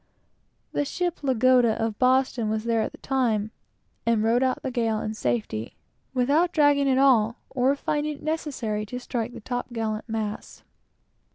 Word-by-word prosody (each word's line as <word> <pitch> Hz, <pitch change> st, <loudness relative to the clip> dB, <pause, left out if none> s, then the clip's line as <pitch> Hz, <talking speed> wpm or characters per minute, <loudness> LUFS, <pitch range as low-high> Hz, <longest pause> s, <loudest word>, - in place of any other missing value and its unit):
The -, -, 0 dB
ship 350 Hz, +4 st, -2 dB
Lagoda, 255 Hz, -3 st, +4 dB
of 225 Hz, -2 st, -2 dB
Boston, 255 Hz, -3 st, +2 dB
was 215 Hz, 0 st, -1 dB
there 230 Hz, -1 st, +1 dB
at -, -, -2 dB
the -, -, -13 dB
time, 225 Hz, -6 st, 0 dB, 0.5 s
and 230 Hz, -2 st, +2 dB
rode 230 Hz, +3 st, +3 dB
out 260 Hz, -1 st, 0 dB
the 265 Hz, -, -2 dB
gale 225 Hz, -3 st, 0 dB
in 215 Hz, 0 st, -3 dB
safety, 120 Hz, -, -2 dB, 0.4 s
without 285 Hz, +7 st, +2 dB
dragging 290 Hz, -3 st, +3 dB
at 260 Hz, -, +3 dB
all, 235 Hz, -5 st, +4 dB, 0.2 s
or 265 Hz, +2 st, +2 dB
finding 295 Hz, +1 st, -2 dB
it -, -, -16 dB
necessary 280 Hz, -9 st, -2 dB
to 250 Hz, +4 st, -5 dB
strike 240 Hz, -1 st, -3 dB
her -, -, -7 dB
top 245 Hz, +2 st, -4 dB
gallant 220 Hz, -1 st, -3 dB
masts. 215 Hz, -1 st, -4 dB
245 Hz, 165 wpm, -25 LUFS, 220-270 Hz, 0.5 s, Lagoda